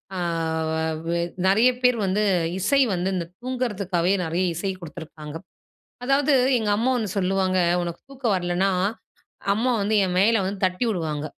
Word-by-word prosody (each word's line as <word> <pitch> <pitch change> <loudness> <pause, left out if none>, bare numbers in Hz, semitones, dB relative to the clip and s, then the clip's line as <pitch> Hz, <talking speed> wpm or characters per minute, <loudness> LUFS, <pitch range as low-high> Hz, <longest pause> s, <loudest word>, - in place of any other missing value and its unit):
அ - - -3 0.9
வ - - -1
அ - - 0 0.3
நிறைய 220 +6 +5
பேரு 250 -1 +4
வந்து 195 +3 +1 0.4
இசை 275 +9 +3
வந்து 180 +1 -1
இந்த 175 -2 -2 0.2
தூங்குறதுக்காவே 200 -8 -1
நிறைய 170 +3 -1
இசை 195 +3 -2
குடுத்துருக்காங்க. 155 -2 -9 0.7
அதாவது 275 +3 +2 0.3
எங்க 215 -2 -1
அம்மா 235 +5 +1
ஒண்ணு 220 -3 -2
சொல்லுவாங்க, 190 0 +1 0.2
உனக்கு 170 -1 -5
தூக்கம் 255 -6 -1
வரலன்னா, 180 +2 0 0.8
அம்மா 235 +5 +1
வந்து 205 +2 0
என் 180 -1 -2
மேலே 225 +3 +4
வந்து 195 +1 -4
தட்டி 185 +6 -2
விடுவாங்க. 155 -6 -2
195 Hz, 150 wpm, -24 LUFS, 175-230 Hz, 0.9 s, நிறைய